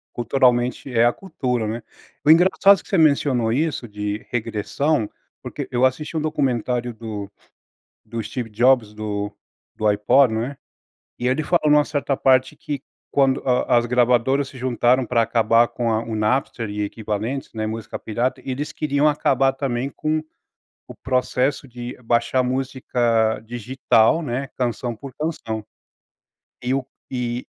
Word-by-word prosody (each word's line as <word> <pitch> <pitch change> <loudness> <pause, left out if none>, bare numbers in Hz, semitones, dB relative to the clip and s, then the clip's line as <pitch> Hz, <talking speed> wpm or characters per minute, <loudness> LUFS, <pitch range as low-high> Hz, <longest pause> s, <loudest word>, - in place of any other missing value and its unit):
Culturalmente, 125 +1 +1
é 115 -1 +4
a 120 - +3
cultura, 125 - -2
né. 115 +2 -4 0.4
O 150 - +7
engraçado 185 +3 +5
que - - -19
você 195 - +2
mencionou 140 -7 +3
isso 145 -2 -1
de 105 0 -4
regressão, 115 +3 -1 0.3
porque - - -6
eu 125 +1 +3
assisti 150 +5 -1
um - - 0
documentário 125 -5 -1
do 110 -3 -6 0.8
do 115 +1 -5
Steve 115 +2 -5
Jobs 115 -1 +3
do 105 -1 -3 0.4
do 110 -1 +1
Ipod, 110 +5 +4
né. 120 +5 -2 0.6
E 125 - -2
ele 130 +5 +1
falou 175 +2 +2
em - - +4
uma 150 - +5
certa 145 -2 -1
parte 130 -1 +3
que 145 -3 -5 0.3
quando 135 -1 +2
a 125 -1 +2
as 120 - +2
gravadoras 125 +3 +2
se 135 - -12
juntaram 125 0 +2
pra 115 0 +2
acabar 115 0 +3
com 120 -2 -1
a 110 +1 0
o 115 -1 -5
Napster 115 0 0
e 105 0 -2
equivalentes, 110 +5 -4
né, 110 -1 -3
música 110 0 -5
pirata, 120 +4 -2
eles 135 +3 -3
queriam 145 0 +1
acabar 135 -3 +2
também 135 -1 -2
com 155 +2 -2 0.6
o - - -10
processo 130 +2 0
de 120 0 -7
baixar 120 +2 +2
música 125 -4 0
digital, 120 +4 +2
né, 130 0 -3
canção 120 -1 -2
por 135 +4 -10
canção. 115 -9 -3 1.0
E 125 - -1
o 135 -2 -2 0.2
e 125 -1 -3
125 Hz, 150 wpm, -22 LUFS, 115-135 Hz, 1.0 s, O